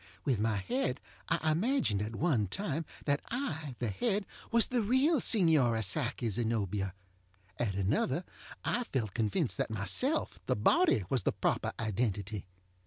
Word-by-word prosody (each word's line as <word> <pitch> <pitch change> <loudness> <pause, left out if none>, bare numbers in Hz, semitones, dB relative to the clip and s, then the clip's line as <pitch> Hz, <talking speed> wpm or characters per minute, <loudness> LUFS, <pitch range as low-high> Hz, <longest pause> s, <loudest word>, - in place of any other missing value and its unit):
With 130 -7 +1
my 110 -1 +1
head 140 - -1 0.3
I 155 - +1
imagined, 190 - +1
at 110 +2 -4
one 130 - +1
time, 160 - -2 0.2
that 145 -1 +1
I, 160 - -3
the 120 -4 -2
head, 205 - 0 0.2
was 235 -1 +5
the 250 -2 0
real 260 +7 +3
Signora 145 - +4
Psyche 120 +1 0
ZenobiaŌĆöat 105 -4 -1 0.7
another 105 - 0 0.4
I 245 - +1
felt 110 - -2
convinced 120 - 0
that - - -1
myself, 110 - 0
the - - +2
body, 340 - +3
was 130 - +3
the - - +1
proper - - 0
identity. 105 -2 -2
125 Hz, 140 wpm, -32 LUFS, -, 0.7 s, was